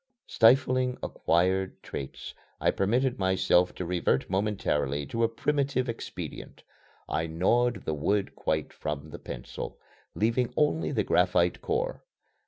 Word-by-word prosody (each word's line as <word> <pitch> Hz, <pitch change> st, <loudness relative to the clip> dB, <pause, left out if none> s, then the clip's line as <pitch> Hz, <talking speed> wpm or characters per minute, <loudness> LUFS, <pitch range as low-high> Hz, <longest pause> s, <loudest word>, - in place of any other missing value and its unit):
Stifling 130 Hz, +1 st, +4 dB
acquired 95 Hz, +3 st, 0 dB
traits, 65 Hz, -1 st, -7 dB, 0.3 s
I -, -, +3 dB
permitted 125 Hz, +6 st, +1 dB
myself 95 Hz, -1 st, +3 dB
to 90 Hz, -, -4 dB
revert 85 Hz, -6 st, +1 dB
momentarily 95 Hz, -8 st, 0 dB
to 115 Hz, +11 st, -1 dB
a 115 Hz, -, +3 dB
primitive 135 Hz, +1 st, 0 dB
expedient. 115 Hz, -1 st, -7 dB, 0.4 s
I 80 Hz, +1 st, -1 dB
gnawed 115 Hz, +10 st, +1 dB
the 80 Hz, -, -1 dB
wood 95 Hz, +7 st, 0 dB
quite -, -, -2 dB
from 75 Hz, 0 st, -5 dB
the -, -, -8 dB
pencil, -, -, -7 dB, 0.4 s
leaving 115 Hz, +3 st, +1 dB
only 150 Hz, +2 st, +2 dB
the -, -, +1 dB
graphite -, -, +2 dB
core. 485 Hz, +3 st, -2 dB
100 Hz, 125 wpm, -28 LUFS, 85-125 Hz, 0.4 s, Stifling